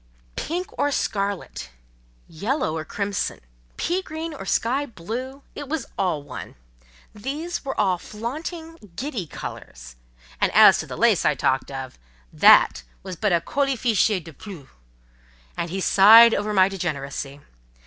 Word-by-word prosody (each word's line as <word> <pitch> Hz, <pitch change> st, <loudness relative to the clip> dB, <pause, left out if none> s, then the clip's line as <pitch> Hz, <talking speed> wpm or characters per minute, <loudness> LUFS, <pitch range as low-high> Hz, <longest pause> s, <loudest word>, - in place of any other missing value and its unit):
"Pink 355 Hz, +4 st, -4 dB
or 290 Hz, -, +2 dB
scarlet, 200 Hz, -, -3 dB, 0.6 s
yellow 200 Hz, -, -2 dB
or 160 Hz, -, -3 dB
crimson, 200 Hz, +4 st, -3 dB, 0.4 s
pea 360 Hz, +2 st, -1 dB
green 320 Hz, -1 st, -6 dB
or 275 Hz, -, -8 dB
sky 270 Hz, +5 st, 0 dB
blue, 250 Hz, +7 st, -7 dB
it 285 Hz, -2 st, -8 dB
was 320 Hz, +1 st, -2 dB
all 175 Hz, -7 st, -1 dB
one: 145 Hz, -, -9 dB, 0.6 s
these 290 Hz, +11 st, -5 dB
were 275 Hz, -, -4 dB
all 190 Hz, -4 st, +2 dB
flaunting, 320 Hz, -, -7 dB, 0.2 s
giddy 245 Hz, -, -4 dB
colours; -, -, -9 dB, 0.5 s
and -, -, +2 dB
as -, -, +7 dB
to -, -, -5 dB
the -, -, -7 dB
lace -, -, +3 dB
I -, -, +2 dB
talked 130 Hz, 0 st, 0 dB
of, 135 Hz, -, -7 dB, 0.3 s
that -, -, +6 dB, 0.2 s
was 185 Hz, -1 st, -6 dB
but 210 Hz, +3 st, 0 dB
a 170 Hz, -1 st, +2 dB
'colifichet 235 Hz, -6 st, +1 dB
de 165 Hz, -1 st, -12 dB
plus.'" 170 Hz, -6 st, -11 dB, 0.9 s
And 170 Hz, -, -3 dB
he 190 Hz, +3 st, -3 dB
sighed 225 Hz, +5 st, +8 dB
over 210 Hz, +1 st, -1 dB
my 190 Hz, -2 st, +5 dB
degeneracy. 145 Hz, -7 st, -5 dB
210 Hz, 140 wpm, -23 LUFS, 170-275 Hz, 0.9 s, sighed